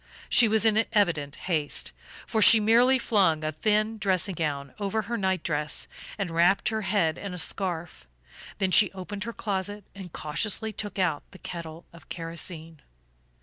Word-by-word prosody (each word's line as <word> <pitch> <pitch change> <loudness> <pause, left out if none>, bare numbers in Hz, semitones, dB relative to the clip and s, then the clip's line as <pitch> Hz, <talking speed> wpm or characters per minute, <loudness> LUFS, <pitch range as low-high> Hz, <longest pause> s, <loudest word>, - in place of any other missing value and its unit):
She 235 - +6
was 220 0 +3
in 220 0 +4
evident 165 -9 +1
haste, 155 -5 -1 0.3
for 220 - -1
she 225 +1 +9
merely 235 +5 +4
flung 190 -10 +1
a 155 - -1
thin 215 +6 0
dressing 190 -1 +1
gown 145 -5 -3
over 210 +2 -1
her 235 +3 -4
night 190 -5 -1
dress 150 -1 -2 0.3
and 195 -5 -3
wrapped 175 +4 +3
her 220 0 -2
head 190 -5 0
in 195 -3 -6
a - - -7
scarf; 175 - -3 0.5
then 190 -1 0
she 205 +1 +6
opened 200 +2 -7
her 235 - -4
closet 205 -1 -4
and 190 -3 -10
cautiously 205 +9 -2
took 205 0 -5
out 170 -6 0
the 190 - -14
kettle 170 -2 -8
of 170 - -16
kerosene. 165 -1 -4
190 Hz, 165 wpm, -26 LUFS, 165-210 Hz, 0.5 s, she